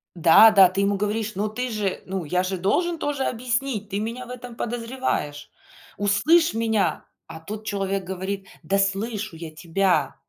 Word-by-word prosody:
Да, 170 +6 +7
да, 195 -3 +7
ты 195 +2 -1
ему 200 0 +1
говоришь: 210 +2 -2
"Ну 210 +2 -1
ты 250 +4 -3
же, 210 -4 -2
ну, 190 -2 -4
я 180 +4 0
же 190 0 -2
должен 330 - 0
тоже 290 -3 -2
объяснить. 240 -3 -2
Ты 200 +1 -2
меня 230 +4 -4
в 250 - -14
этом 245 -1 -8
подозреваешь. 230 - -3 0.5
Услышь 315 - +3
меня!" 225 -2 0 0.2
А 160 - -9
тот 210 +6 -8
человек 195 -2 -2
говорит: 190 +1 -5 0.2
"Да 195 +5 +1
слышу 200 0 -1
я 160 -1 -8
тебя". 170 -2 0
205 Hz, 170 wpm, -24 LUFS, 190-230 Hz, 0.5 s, Да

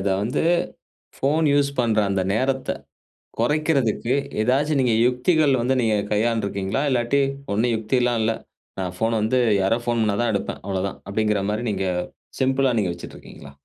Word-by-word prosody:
அத 100 - -1
வந்து, 115 +4 -1 0.7
phone 155 +4 +1
use 145 -1 +3
பண்ற 115 -3 +2
அந்த 95 -1 0
நேரத்த 130 +4 -1 0.7
கொறைக்கிறதுக்கு 135 -3 +1 0.3
ஏதாச்சு 135 +7 +2
நீங்க 125 -3 +2
யுக்திகள் 140 +4 +2
வந்து 130 +3 +1
நீங்க 110 -2 +2 0.2
கையாண்டுருக்கீங்களா? 105 0 0
இல்லாட்டி, 130 +2 +1 0.3
"ஒண்ணும் 115 +3 +1
யுக்திலாம் 120 +2 0
இல்ல. 110 +1 +2 0.5
நான் 90 -1 -3
ஃபோன் 115 +2 0
வந்து 110 +4 +1 0.2
யாரோ 95 +4 +2
ஃபோன் 120 -1 +1
பண்ணா 105 -2 +1
தான் 120 -1 +1
எடுப்பேன். 100 - -3
அவ்ளோதான்." 95 0 -3
அப்டீங்குற 105 -1 0
மாதிரி 110 +3 -2
நீங்க 95 -1 -2 0.6
சிம்பிளா 135 0 +2
நீங்க 95 -4 0
வச்சிட்ருக்கீங்களா? 80 -4 -11
115 Hz, 145 wpm, -23 LUFS, 105-130 Hz, 0.7 s, use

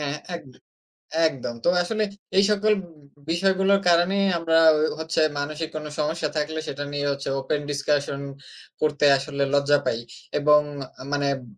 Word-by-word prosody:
হ্যাঁ, 145 0 -2 0.2
একদ 135 -6 -14 0.8
একদম। 125 -5 -5
তো - - +5
আসলে 215 +4 -1 0.3
এই 195 - +7
সকল 210 +1 +3
বি - - -12 0.4
বিষয়গুলোর 195 +2 +2
কারণেই 180 +4 +3
আমরা 165 -1 +2 0.2
হ - - 0 0.2
হচ্ছে 160 0 -1 0.2
মানসিক 155 +2 -3
কোনো 150 -1 -5
সমস্যা 155 +1 -1
থাকলে, 155 +1 -2
সেটা 145 +1 -4
নিয়ে 145 0 -1
হচ্ছে 140 0 -4
ওপেন 145 +2 -2
ডিসকাশন 140 0 -1 0.6
করতে 150 -1 +1
আসলে 140 +1 -2
লজ্জা 145 +1 +4
পাই 115 - 0 0.4
এবং 150 +1 +6 0.5
মানে 145 -1 0
ব - - -14
150 Hz, 150 wpm, -24 LUFS, 145-170 Hz, 0.8 s, এই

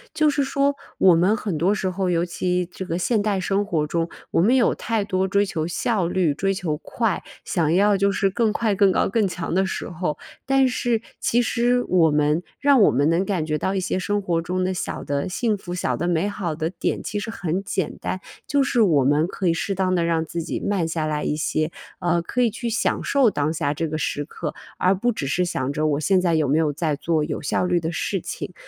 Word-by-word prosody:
就 310 - +3
是 285 -1 +1
说， 280 +1 +1 0.2
我 185 -3 +6
们 185 +6 +3
很 190 -8 -3
多 190 +5 +2
时 190 -2 -1
候 185 0 -1
尤 170 0 +1
其 180 0 -1
这 190 - -6
个 165 - -1
现 215 +3 +1
代 205 -2 0
生 195 +2 0
活 160 -7 0
中， 165 +2 -1 0.2
我 - - +3
们 230 +8 +4
有 245 - +3
太 225 -2 -1
多 190 -1 0
追 200 +1 +2
求 160 -4 -3
效 190 0 0
率、 175 -5 +1
追 195 +6 0
求 170 -5 -2
快， 225 +6 -2 0.2
想 160 -3 0
要 200 +2 +4
就 200 +1 +2
是 195 0 +1
更 225 0 +1
快 215 -1 0
更 195 0 +4
高 - - +2
更 210 0 +1
强 175 -3 -4
的 190 +2 +3
时 - - -4
候。 175 -3 -3 0.3
但 270 -1 +4
是， 240 -2 0 0.2
其 240 - +2
实 245 +2 +1
我 170 -3 +3
们， 150 +2 +2 0.2
让 280 -4 +5
我 - - +7
们 140 +5 +2
能 175 +3 +2
感 185 -6 -1
觉 155 -1 -1
到 190 - -1
一 190 - +1
些 185 0 -1
生 205 +2 -1
活 170 -3 0
中 185 +2 -2
的 185 +1 0
小 180 - -4
的 140 +4 -2
幸 220 +3 0
福、 180 -2 -6
小 180 - -1
的 175 - -2
美 175 +2 +1
好 180 -6 -3
的 160 +1 -2
点 - - -2
其 205 0 -3
实 225 - -5
很 180 -3 -2
简 190 -4 -2
单， 185 - -3 0.3
就 285 -1 +2
是 245 -3 +1
我 150 -10 +4
们 150 +4 +3
可 185 0 -3
以 165 - +4
适 195 +4 -2
当 185 -1 +1
地 175 - +2
让 165 -1 +1
自 170 +1 -4
己 165 - -4
慢 195 -5 0
下 160 -1 -2
来 150 -1 -2
一 150 - 0
些， 155 +1 -1 0.3
呃， 175 -1 +1
可 250 +8 -1
以 240 - +4
去 235 +2 -4
享 225 - 0
受 275 -5 +3
当 150 -3 -1
下 145 -2 -1
这 165 +2 -2
个 155 +1 -3
时 145 -1 -2
刻， 150 +1 -5 0.3
而 185 +2 +3
不 240 +6 +1
只 145 -10 -4
是 180 +6 +1
想 140 -6 -2
着 155 +1 -1
我 145 -1 +1
现 185 +4 +3
在 175 -2 +1
有 155 -3 +2
没 145 +4 +2
有 155 -2 +2
在 155 -1 -1
做 155 +1 0
有 - - -3
效 165 - 0
率 180 -1 +2
的 160 0 -3
事 190 +3 -2
情。 - - -6
180 Hz, 265 characters per minute, -23 LUFS, 160-205 Hz, 0.3 s, 我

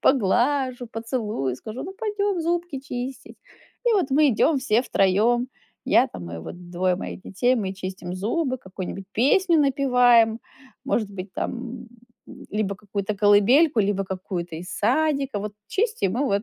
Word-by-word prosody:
поглажу, 255 +2 +2
поцелую, 220 - -3
скажу: 220 - -7
"Ну 375 - -6
пойдем 410 -4 -1
зубки 340 -3 -2
чистить". 260 -1 -6 0.5
И 475 - +5
вот 370 -9 +2
мы 290 +2 +5
идем 275 +5 +3
все 240 -3 +2
3: 225 +4 +2 0.4
я - - +4
там, 90 -2 -8
и 85 - -5
вот 175 - -9
2 180 +1 +1
моих 190 - -6
детей, 245 +7 +1
мы 195 -4 -2
чистим 185 -1 -6
зубы, 255 - -1
какую-нибудь 190 -1 -7
песню 330 - +3
напеваем, 250 -5 +4 0.4
может 215 -4 0
быть, 190 -1 -8
там, 240 0 -5 0.4
м, - - -12
либо 205 -2 -1
какую-то 205 0 -4
колыбельку, 220 +8 +5
либо 195 -1 0
какую-то 180 -3 -5
из 180 +2 -8
садика. 275 +1 +1
Вот 210 0 -5 0.2
чистим 390 - 0
и - - +1
вот 200 -6 +1
230 Hz, 150 wpm, -24 LUFS, 195-275 Hz, 0.5 s, И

